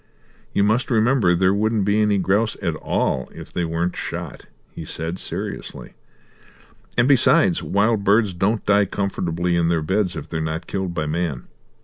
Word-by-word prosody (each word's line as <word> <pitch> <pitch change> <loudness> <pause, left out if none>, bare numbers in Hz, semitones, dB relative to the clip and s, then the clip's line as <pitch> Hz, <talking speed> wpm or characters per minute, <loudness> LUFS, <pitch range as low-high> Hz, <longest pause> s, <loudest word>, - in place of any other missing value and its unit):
"You 100 - +1
must 110 +5 +1
remember 115 -5 +3
there 95 +2 +3
wouldn't 110 0 +1
be 105 +1 +2
any 105 -1 +2
grouse 100 +4 +1
at 85 - -1
all 65 -3 -1
if - - -11
they 90 - -1
weren't 85 +2 -2
shot," - - -6 0.3
he - - -8
said 80 +3 -5
seriously, - - -6 1.0
"and 120 +1 +4
besides, 145 +6 +4
wild 105 +1 +1
birds 100 0 +3
don't 100 +5 0
die 100 0 +4
comfortably 90 -3 -2
in 85 -1 +2
their 85 -2 +1
beds 95 +2 0
if 75 -1 -6
they're 80 0 -3
not 80 +2 -3
killed 95 -3 -3
by 75 -2 -1
man. 75 -4 -2
95 Hz, 165 wpm, -22 LUFS, 85-105 Hz, 1.0 s, and